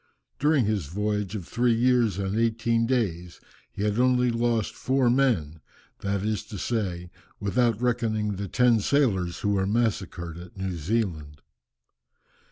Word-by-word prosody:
During 145 -4 +3
his 100 -8 -1
voyage 105 +3 -2
of 95 -5 -6
three 120 -1 +2
years 120 -4 +2
and 100 0 -2
eighteen 115 0 +1
days, 90 -9 -1 0.3
he 100 - -4
had 105 +2 0
only 125 -1 +3
lost 115 -2 0
four 130 -2 +1
men, 100 - +1 0.4
that 100 -1 -2
is 105 -2 -1
to 105 - -8
say, 90 -5 -3 0.3
without 115 +2 +1
reckoning 110 -4 0
the 100 +1 -4
ten 120 +2 +3
sailors 100 -8 +1
who 105 - 0
were 95 -1 +1
massacred 95 -6 -1
at 90 +2 -12
New 95 -1 -3
Zealand. 80 -5 -3
105 Hz, 145 wpm, -26 LUFS, 95-120 Hz, 0.4 s, During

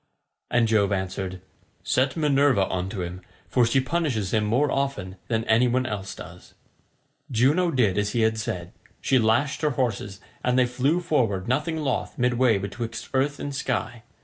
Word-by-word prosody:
And 120 -1 +3
Jove 105 -2 +2
answered, 95 -1 -3 0.4
"Set 130 +5 +1
Minerva 140 -8 +3
on 95 0 -2
to 95 -3 -4
him, 90 +1 -6 0.3
for 120 +7 +3
she 125 +3 +3
punishes 130 - -1
him 110 -1 +2
more 125 +7 +2
often 120 -9 -2
than 115 -1 0
any 115 +3 +3
one 130 +1 +1
else 100 -5 -4
does." 90 0 -12 0.7
Juno 140 +9 +3
did 110 - +2
as 105 0 -1
he 120 - +1
had 110 0 +2
said. 90 -5 -4 0.3
She 130 - +2
lashed 130 +7 +1
her 150 - +2
horses, 110 -7 -2 0.2
and 125 0 +2
they 130 - +5
flew 135 +8 0
forward 110 - 0
nothing 150 +6 0
loth 150 -3 -2
midway 125 -2 +3
betwixt 110 +4 -5
earth 140 +2 +1
and 145 - -4
sky. 120 -3 -2
120 Hz, 170 wpm, -25 LUFS, 100-135 Hz, 0.7 s, they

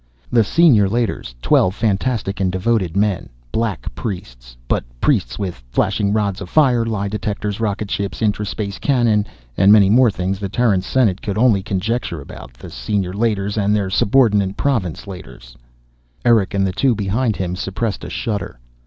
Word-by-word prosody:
The 115 -2 +4
Senior 115 - +4
Leiters, 110 - -2
twelve 95 +1 +3
fanatic 105 -2 -1
and 95 -2 +1
devoted 95 -2 0
men, 100 -3 0 0.2
black 110 - -2
priests, - - -7
but - - 0 0.2
priests - - +1
with 90 -10 -5
flashing 100 - 0
rods 100 -3 -1
of 95 - -7
fire, 130 -7 +3
lie 105 -3 -2
detectors, 105 0 -3
rocket 105 -2 -2
ships, 100 -1 -3
intra 105 -1 0
space 100 -1 -4
cannon, 115 -6 +2 0.3
many 100 +2 +6
more 125 +1 +5
things 95 -1 -3
the 100 -1 -4
Terran 110 -4 +2
Senate 100 -2 +1
could 100 -1 -3
only 110 -4 +4
conjecture 100 -2 -2
about. 65 -2 -11
The - - -11
Senior 100 -4 -2
Leiters 105 -1 -1
and 105 +1 +2
their 100 -3 -1
subordinate 100 -3 +2
Province 110 - -1
Leiters 90 -10 -11 0.7
Erick 110 -5 +3
and 95 0 +2
the 95 - 0
two 125 +4 +2
behind 110 +3 0
him 90 0 -3
suppressed 95 +2 -3
a - - -6
shudder. 105 - -4
100 Hz, 160 wpm, -19 LUFS, 95-115 Hz, 0.7 s, many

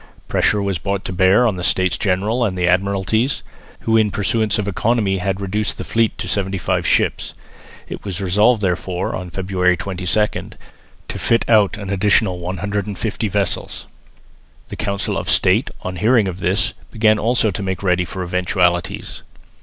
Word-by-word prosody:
Pressure 105 -2 +1
was 100 -4 -1
brought 100 +5 -3
to 95 - -4
bear 95 +6 +4
on 105 -6 +1
the 90 - -5
States 90 0 +2
General 105 +6 0
and 95 -5 -1
the 90 - +1
Admiralties, 100 +7 +1 0.4
who 115 - +1
in 110 -2 +4
pursuance 105 +2 0
of 105 -1 -2
economy 100 -1 0
had 95 +1 -2
reduced 105 +2 -2
the - - -5
fleet 115 -1 0
to - - -5
seventy 95 -1 -1
five 90 - -1
ships. - - +1 0.5
It - - -7
was 95 -3 -4
resolved 105 +4 +3
therefore, 90 -1 -1
on 90 -1 -6
February 90 0 0
22, 95 +3 -1 0.5
to - - -5
fit 115 0 +2
out 105 -4 +4
an 100 -2 -6
additional 100 -1 +2
150 100 +4 -3
vessels. 100 -2 -2 0.8
The - - -6
Council 100 -2 -2
of - - -5
State, - - +3
on 90 0 -4
hearing 110 0 +3
of 90 0 -5
this, 95 +3 +1 0.2
began 110 -1 +2
also 115 -1 +2
to 95 - -5
make 95 0 -3
ready 90 -1 +2
for 95 +1 -5
eventualities. 90 -1 -1
100 Hz, 165 wpm, -19 LUFS, 90-105 Hz, 0.8 s, bear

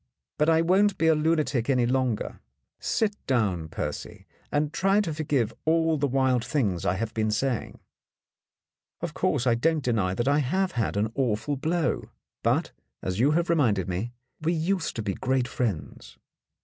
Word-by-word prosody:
But 150 +2 +4
I 165 0 +4
won't 195 +3 +3
be 165 - +1
a 160 - +6
lunatic 150 -5 +1
any 125 -3 +3
longer. 125 -3 -1 0.4
Sit 215 -2 0
down, 100 -11 +1
Percy, - - -5 0.3
and 150 +1 0
try 195 +2 +3
to 175 -7 -1
forgive 140 -7 0
all 160 0 +3
the 145 -1 +1
wild 130 -2 +2
things 105 - 0
I - - +2
have 110 +3 -3
been 110 -1 0
saying. 120 +3 -1 1.2
Of - - -3
course, 125 - 0
I 120 - +4
don't 155 +5 +1
deny 105 -7 +1
that 120 +4 -1
I 145 +1 +4
have 185 +8 0
had 115 -4 -1
an 110 +2 0
awful 130 +2 0
blow. 160 +4 -1 0.3
But, - - +1 0.3
as 95 +2 -2
you 130 +5 +4
have 170 +2 +1
reminded 110 - +2
me, 95 +6 -3 0.3
we 165 +2 +1
used 175 +2 -1
to 110 - -3
be 100 -2 -1
great 130 +1 0
friends. 115 - -4
135 Hz, 170 wpm, -26 LUFS, 115-160 Hz, 1.2 s, a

